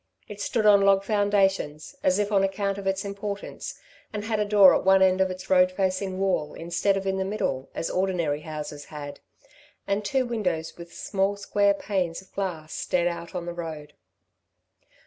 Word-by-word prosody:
It 205 -1 -8
stood 220 +1 0
on 205 -1 +7
log 195 0 +4
foundations, 195 -7 +1
as 185 - +3
if 205 0 0
on 195 -2 +3
account 195 0 -1
of 195 - -5
its 195 +1 0
importance, 200 0 -6 0.3
and 210 -1 -4
had 220 -1 -1
a 210 - +2
door 205 -2 +7
at - - +1
one 190 0 +5
end 190 0 +3
of 190 - +3
its 185 +1 -7
road 185 -1 +5
facing 185 0 -1
wall 190 -6 0
instead 175 +4 0
of 195 - -4
in 190 0 0
the - - +1
middle, 190 -10 -2
as - - -2
ordinary 175 -6 0
houses 150 -2 -7
had, 145 -2 -8 0.7
and 200 +1 -1
two 260 +5 +1
windows 180 -9 -2
with 170 0 -11
small 195 +2 -1
square 200 0 +2
panes 185 -5 -2
of 190 - -17
glass 165 -6 -4
stared 175 -1 0
out 170 0 -5
on 175 -1 -3
the 175 - -4
road. 155 -3 -7
190 Hz, 185 wpm, -26 LUFS, 170-200 Hz, 0.7 s, on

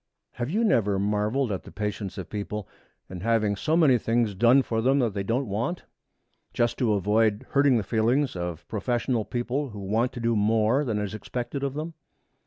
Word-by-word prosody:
Have 120 +1 -4
you 215 +8 +1
never 105 - +2
marveled 105 +5 0
at 95 - -2
the - - -13
patience 105 -1 -4
of 95 - -5
people 105 -1 -5 0.4
in 95 - -8
having 110 0 +1
so 155 +10 0
many 140 -8 +5
things 115 -1 +1
done 120 +7 +5
to 115 -2 -1
them 135 +4 +3
that 120 -6 +1
they 100 - -2
don't 115 +6 -1
want, 115 - -2 0.7
just 120 0 +1
to 120 -5 +2
avoid 105 +2 +1
hurting 140 -3 +4
the 110 - 0
feelings 115 +7 +1
of 85 -2 -5
professional 120 +1 -1
people 125 +4 -2
who 105 -2 -9
want 110 +6 0
to - - -6
do 115 0 +1
more 110 +5 +2
than 115 -6 -1
is 105 0 -3
expected 120 +5 -5
of 140 -1 -2
them? 160 +3 -4
115 Hz, 195 wpm, -26 LUFS, 105-130 Hz, 0.7 s, many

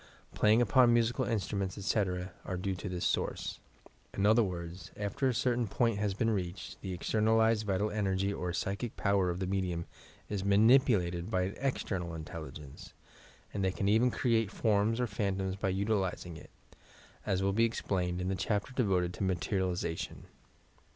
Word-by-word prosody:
Playing 110 +3 +4
upon 125 -1 +5
musical 120 +2 +1
instruments, 100 -3 -2
etc., 90 -2 -1
are 90 - -4
due 95 +2 -2
to 90 +2 -5
this 90 -1 -3
source. - - -1 0.6
In 100 - +1
other 110 +3 +6
words, 90 -3 -4
after 125 +7 -1
a 130 - +2
certain 120 -1 +1
point 115 0 +1
has 105 -2 0
been 115 +2 +1
reached, 90 -3 -4
the 95 - -5
externalized 110 +4 +2
vital 100 +2 0
energy 100 -1 0
or 90 -2 -3
psychic 100 +6 -3
power 100 -3 +2
of 85 - -2
the 95 - -2
medium 90 -3 -1 0.4
is 100 -2 -3
manipulated 100 -4 +4
by 90 -1 +1
an 95 +2 -3
external 95 -10 -2
intelligence, 75 -3 -9 0.6
and 100 - -2
they 95 - +2
can 100 +1 -2
even 110 +5 +4
create 115 -4 +1
forms 110 +2 +1
or 125 - +2
phantoms 95 -3 -2
by 95 0 -1
utilizing 95 -3 -1
it, - - -12 0.7
as 95 -1 0
will 100 0 +1
be 115 +3 +4
explained 90 -5 -1
in 90 - -2
the 95 - 0
chapter 105 +6 -1
devoted 95 -8 +1
to - - -4
Materialization. 90 -2 -2
100 Hz, 165 wpm, -32 LUFS, 90-110 Hz, 0.7 s, other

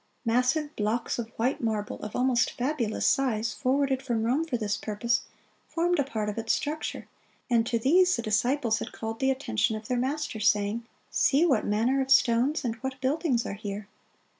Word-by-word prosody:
Massive 255 +6 +1
blocks 220 +3 -1
of 225 -1 -4
white 250 +4 0
marble, 215 -3 -2
of 210 - -7
almost 250 -1 +2
fabulous 245 -4 -1
size, 230 -5 +1
forwarded 270 0 +1
from 240 -5 -1
Rome 255 +8 +1
for 275 -7 -2
this 210 -2 -1
purpose, 235 +3 -1 0.5
formed 345 0 0
a - - +4
part 220 -6 -3
of 210 +2 -3
its 225 - +1
structure; 305 +1 -3 0.4
and 230 -1 +3
to 235 - +1
these 360 +10 +4
the 235 - -4
disciples 230 +1 +1
had - - -6
called 225 0 -5
the 265 - +2
attention 235 -5 0
of 215 0 -7
their 250 -1 0
Master, 265 -2 -2
saying, 210 +2 +1 0.2
"See 290 +5 +3
what 265 -10 +2
manner 235 +6 +2
of 265 - -3
stones 265 +4 +3
and 230 - 0
what 265 +2 -5
buildings 265 -2 0
are - - -3
here!" 205 0 -6
240 Hz, 185 wpm, -27 LUFS, 220-270 Hz, 0.5 s, a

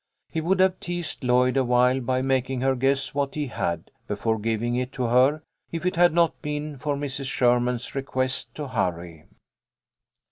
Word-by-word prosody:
He 160 - -1
would 185 +4 +1
have 185 0 +3
teased 175 -4 -5
Lloyd 125 +1 +3
awhile 125 0 +3
by 130 +1 0
making 130 -1 0
her 135 0 +3
guess 135 +1 0
what 140 -1 -1
he 150 -1 -1
had, 85 - -3 0.2
before 110 +2 -1
giving 115 +2 -1
it 125 +1 -2
to 130 - -2
her, 130 +6 +3 0.3
if 170 +1 -4
it 180 - +1
had 175 +1 +5
not 170 0 +2
been 150 -1 -4
for 145 +2 -1
Mrs. 140 -1 -4
Sherman's 125 -1 +1
request 130 -1 -2
to 150 -3 -5
hurry. 85 -7 -3
130 Hz, 170 wpm, -25 LUFS, 125-150 Hz, 0.3 s, had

